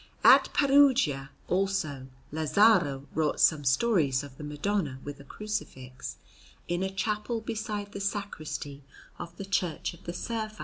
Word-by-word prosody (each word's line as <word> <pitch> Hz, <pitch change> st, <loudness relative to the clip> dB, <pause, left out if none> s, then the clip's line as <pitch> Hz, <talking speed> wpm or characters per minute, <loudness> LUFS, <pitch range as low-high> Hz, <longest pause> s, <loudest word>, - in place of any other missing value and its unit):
At -, -, +7 dB
Perugia, 270 Hz, -, +4 dB, 0.2 s
also, 180 Hz, -8 st, -1 dB, 0.2 s
Lazzaro 155 Hz, -3 st, +3 dB
wrought 155 Hz, -2 st, 0 dB
some 155 Hz, -3 st, +4 dB
stories 140 Hz, -, +2 dB
of 140 Hz, -2 st, -11 dB
the 150 Hz, -, -10 dB
Madonna, 150 Hz, -1 st, -2 dB
with 145 Hz, 0 st, -7 dB
a -, -, -11 dB
Crucifix, 135 Hz, -8 st, -6 dB, 0.5 s
in 175 Hz, +1 st, -1 dB
a 190 Hz, -, 0 dB
chapel 210 Hz, +4 st, -2 dB
beside 215 Hz, -2 st, -4 dB
the 200 Hz, -, -6 dB
Sacristy 155 Hz, -8 st, -4 dB, 0.4 s
of 170 Hz, 0 st, -8 dB
the 195 Hz, -, -6 dB
Church 190 Hz, -5 st, -1 dB
of 170 Hz, -, -17 dB
the 175 Hz, -, -4 dB
Servi. 215 Hz, +2 st, -4 dB
175 Hz, 140 wpm, -28 LUFS, 145-210 Hz, 0.5 s, At